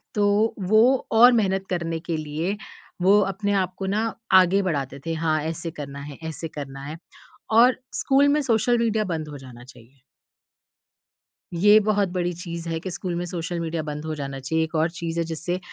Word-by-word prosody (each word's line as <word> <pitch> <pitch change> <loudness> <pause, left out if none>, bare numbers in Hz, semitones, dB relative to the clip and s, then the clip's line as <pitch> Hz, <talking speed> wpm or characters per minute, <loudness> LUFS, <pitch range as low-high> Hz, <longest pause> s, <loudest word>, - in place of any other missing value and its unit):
तो 210 +1 +2
वो 215 +1 +6 0.3
और 235 +3 +8
मेहनत 195 -4 +1
करने 170 -2 -2
के 165 0 -3
लिए, 155 +6 -3 0.4
वो 195 +3 +5
अपने 205 +1 -2
आपको 185 +1 -6
ना 205 +4 0 0.4
आगे 185 +2 +2
बढ़ाते 140 -7 -3
थे। 165 - -2
हाँ, 160 -1 0
ऐसे 165 +1 -4
करना 140 -3 -8
है 145 -1 -9
ऐसे 160 +1 -5
करना 135 -1 -7
है 155 +3 -6 0.6
और 245 +2 +6 0.2
स्कूल 280 +1 +3
में 300 +1 +2
सोशल 240 -2 +2
मीडिया 220 -2 +1
बंद 155 -1 -5
हो 145 - -8
जाना 125 -3 -12
चाहिए। 125 +1 -18 1.5
ये 205 +5 +6
बहुत 205 -2 +1
बड़ी 175 -1 -1
चीज़ 170 -1 -7
है 165 0 -2
कि 185 - -6
स्कूल 175 0 -4
में 175 +1 -2
सोशल 175 0 -4
मीडिया 165 -1 -2
बंद 150 0 -6
हो 155 0 -3
जाना 140 -2 -5
चाहिए। 160 +5 0
एक 160 +1 -5
और 160 +2 +2
चीज़ 170 0 -5
है - - +2
जिससे 165 +3 -3
170 Hz, 185 wpm, -24 LUFS, 155-200 Hz, 1.5 s, और